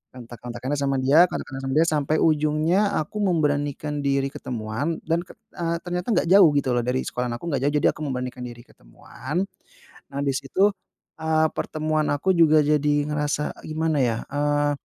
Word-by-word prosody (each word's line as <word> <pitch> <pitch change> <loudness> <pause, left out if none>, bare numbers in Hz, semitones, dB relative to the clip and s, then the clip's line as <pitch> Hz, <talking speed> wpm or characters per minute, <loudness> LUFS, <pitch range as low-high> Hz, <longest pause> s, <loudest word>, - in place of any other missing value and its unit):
kontak-kontakkannya 120 +3 -5
sama 140 -1 0
dia, 140 +7 +6
kontakan 135 -1 -5
sama 135 0 -2
dia, 160 - +6
sampai 150 -1 +1
ujungnya 155 +3 +2 0.2
aku 155 +7 -7
memberanikan 150 -4 0
diri 140 0 +1
ketemuan 125 +3 -3
dan, 165 +1 +1 0.4
eee, 170 -1 -1
ternyata 180 0 -4
enggak - - +1
jauh, 195 -4 +8
gitu 135 -2 0
loh, 120 - +1
dari 125 +1 0
sekolahan 125 -1 -3
aku - - -8
enggak 135 -3 -1
jauh, 145 - 0
jadi - - +3
aku - - -12
memberanikan 125 -1 -4
diri 120 0 -10
ketemuan, 130 - -6 0.7
habis 140 -1 -1
itu, 195 +9 +3 0.5
eee, 160 0 +2
pertemuan 155 0 -1
aku 165 +7 +1
juga 155 -2 +5
jadi 150 0 +2 0.2
ngerasa 150 0 -1
gimana 160 0 -1
ya, 115 -3 +1
eee, 145 +1 +1
145 Hz, 160 wpm, -24 LUFS, 135-160 Hz, 0.7 s, jauh